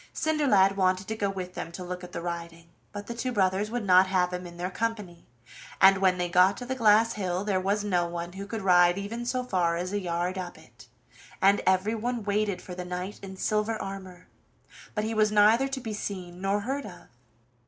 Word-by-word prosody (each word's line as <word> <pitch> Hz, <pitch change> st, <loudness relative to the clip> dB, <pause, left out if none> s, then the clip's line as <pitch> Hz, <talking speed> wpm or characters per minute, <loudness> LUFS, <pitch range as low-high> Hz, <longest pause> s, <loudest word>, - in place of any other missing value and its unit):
Cinderlad 235 Hz, -12 st, +3 dB
wanted 185 Hz, 0 st, +1 dB
to 220 Hz, -, -2 dB
go 205 Hz, -2 st, -1 dB
with 185 Hz, -2 st, -5 dB
them 165 Hz, -, -6 dB
to 180 Hz, -, -6 dB
look 180 Hz, 0 st, -6 dB
at 180 Hz, -, -9 dB
the 170 Hz, -, -5 dB
riding, 170 Hz, -1 st, -6 dB, 0.2 s
but 205 Hz, 0 st, -7 dB
the 235 Hz, -, -5 dB
two 245 Hz, +2 st, -3 dB
brothers 195 Hz, -1 st, +1 dB
would 240 Hz, -2 st, -3 dB
not 185 Hz, 0 st, +6 dB
have 180 Hz, -1 st, +1 dB
him 180 Hz, 0 st, -5 dB
in 175 Hz, 0 st, -12 dB
their 180 Hz, +2 st, -3 dB
company, 210 Hz, -6 st, -4 dB, 0.5 s
and 195 Hz, 0 st, +7 dB
when 185 Hz, -1 st, +3 dB
they 180 Hz, 0 st, -1 dB
got 180 Hz, +2 st, +4 dB
to 245 Hz, -, -6 dB
the 260 Hz, -, -2 dB
glass 230 Hz, -2 st, +4 dB
hill 185 Hz, -2 st, -2 dB
there 200 Hz, -2 st, 0 dB
was 200 Hz, +2 st, 0 dB
no 180 Hz, -4 st, +1 dB
one 170 Hz, 0 st, -5 dB
who 195 Hz, +1 st, -7 dB
could 220 Hz, -1 st, -5 dB
ride 175 Hz, -1 st, +5 dB
even 230 Hz, +4 st, -5 dB
so 255 Hz, +1 st, -1 dB
far 180 Hz, -8 st, 0 dB
as 180 Hz, +3 st, -4 dB
a 205 Hz, -, 0 dB
yard 175 Hz, +1 st, -2 dB
up 180 Hz, -1 st, -6 dB
it, -, -, -18 dB, 0.5 s
and 195 Hz, +1 st, +4 dB
everyone 220 Hz, +5 st, 0 dB
waited 205 Hz, -1 st, -1 dB
for 180 Hz, -, -8 dB
the 180 Hz, 0 st, -5 dB
knight 180 Hz, +3 st, -5 dB
in 190 Hz, -1 st, -9 dB
silver 215 Hz, +2 st, 0 dB
armor, 190 Hz, -2 st, -8 dB, 0.7 s
but 210 Hz, -, 0 dB
he 220 Hz, +1 st, -2 dB
was 215 Hz, -1 st, +2 dB
neither 215 Hz, +5 st, +5 dB
to 270 Hz, 0 st, -4 dB
be 225 Hz, -4 st, -5 dB
seen 185 Hz, -3 st, -6 dB
nor 200 Hz, +1 st, 0 dB
heard 270 Hz, +4 st, -3 dB
of. 180 Hz, -, -12 dB
195 Hz, 215 wpm, -27 LUFS, 180-215 Hz, 0.7 s, and